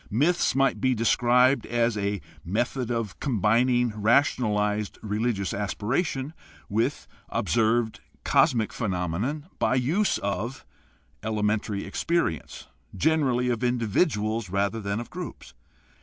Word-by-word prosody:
Myths 150 - +2
might 135 0 +2
be 130 -1 +2
described 125 +3 +3
as 120 -1 +1
a 100 -1 -2 0.2
method 120 +6 -1
of 115 -4 -3
combining 120 0 +2
rationalized 105 -3 +1
religious 105 -2 -1
aspiration 130 - -2 0.3
with 115 +7 -1 0.2
observed 115 0 +1 0.2
cosmic 115 -8 +3
phenomena 100 - -2 0.2
by 130 - +2
the 125 - +1
use 185 +11 +1
of 110 +6 -3 0.6
elementary 105 -1 -1
experience, 100 - -2 0.3
generally 135 -6 +2
of 120 0 -1
individuals 115 - 0
rather 100 +4 0
than 100 +1 -2
of 120 - -8
groups. - - -8
115 Hz, 110 wpm, -26 LUFS, 105-130 Hz, 0.6 s, described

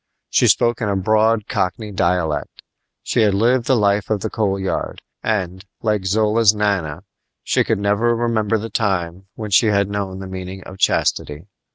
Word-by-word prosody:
She - - +4
spoke 120 0 +2
in 105 - 0
a 100 - 0
broad 110 +2 +2
Cockney 105 +3 -2
dialect. 85 -5 -1 0.4
She - - 0
had 105 -3 +3
lived 120 +4 +2
the 130 - +4
life 100 -2 +1
of 105 -3 0
the - - -3
Coal 100 -4 0
Yard, 95 - -3 0.2
and, 95 -4 -2 0.2
like 105 -3 0
Zola's 105 +1 +3
Nana, 95 -6 -1 0.4
she - - +2
could - - 0
never 105 +4 +1
remember 110 -2 0
the 110 +1 -6
time 95 -5 -2
when 110 -2 -6
she 105 +4 +5
had 100 -1 +1
known 100 -2 -3
the 95 - -7
meaning 95 0 -7
of 95 +1 -11
chastity. 75 +3 0
100 Hz, 175 wpm, -20 LUFS, 95-110 Hz, 0.4 s, she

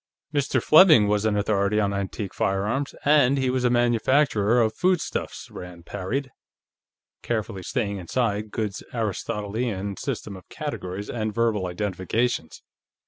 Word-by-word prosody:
"Mr. 140 -1 +1
Fleming 155 - +7
was 105 +1 +1
an 105 -1 +2
authority 100 0 +1
on 100 -1 +1
antique 100 0 -4
firearms, 105 +9 -1
and 140 -2 +5
he 130 -1 +1
was 130 -1 -1
a 125 - +4
manufacturer 120 -1 +3
of 110 -2 +2
foodstuffs," 180 -2 -1
Rand 90 -1 -10
parried, 130 +8 -3 0.9
carefully 110 -5 -3
staying 100 +3 -2
inside 105 +3 -1
Goode's 105 -2 -3
Aristotelian 105 -1 -3
system 100 - -4
of 95 - -14
categories 95 +3 -5
and 110 -2 -2
verbal 110 -5 +1
identifications. 95 0 -2
105 Hz, 130 wpm, -25 LUFS, 100-125 Hz, 0.9 s, Fleming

